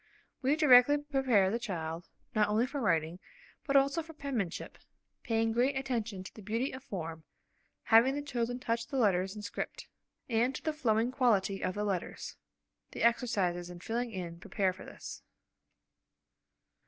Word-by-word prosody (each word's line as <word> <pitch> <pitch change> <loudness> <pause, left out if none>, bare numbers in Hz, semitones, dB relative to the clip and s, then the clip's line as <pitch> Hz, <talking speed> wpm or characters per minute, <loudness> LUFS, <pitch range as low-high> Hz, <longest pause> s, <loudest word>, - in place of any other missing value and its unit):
We 275 +2 +3
directly 290 -2 +7
prepare 265 -9 +2
the 230 - -1
child, 170 -6 -4 0.2
not 210 -1 +3
only 220 +3 +2
for 275 +2 -4
writing, 165 -4 +1 0.5
but 280 - 0
also 275 +4 +4
for 325 0 -11
penmanship, 265 - -4 0.4
paying 225 -1 +1
great 255 +4 +2
attention 230 -7 -2
to - - -10
the 215 - -11
beauty 225 +7 -1
of 260 - -9
form 165 -4 -6 0.6
(having 235 +5 +5
the 290 - -3
children 245 -3 -2
touch 230 -2 -2
the 275 - -3
letters 190 -4 +2
in 210 - -7
script 205 - -5 0.4
form) 225 -3 +1
and 255 +2 +1
to - - -7
the 315 - 0
flowing 235 -5 +1
quality 210 -7 +2
of 185 - -1
the 205 - -1
letters. 195 -4 -3 0.6
(The - - -3
exercises 195 -7 +1
in 175 -1 -9
filling 235 +6 -2
in 175 -4 -6
prepare 190 0 0
for 185 - -11
this.) - - -9
230 Hz, 165 wpm, -32 LUFS, 190-260 Hz, 0.6 s, directly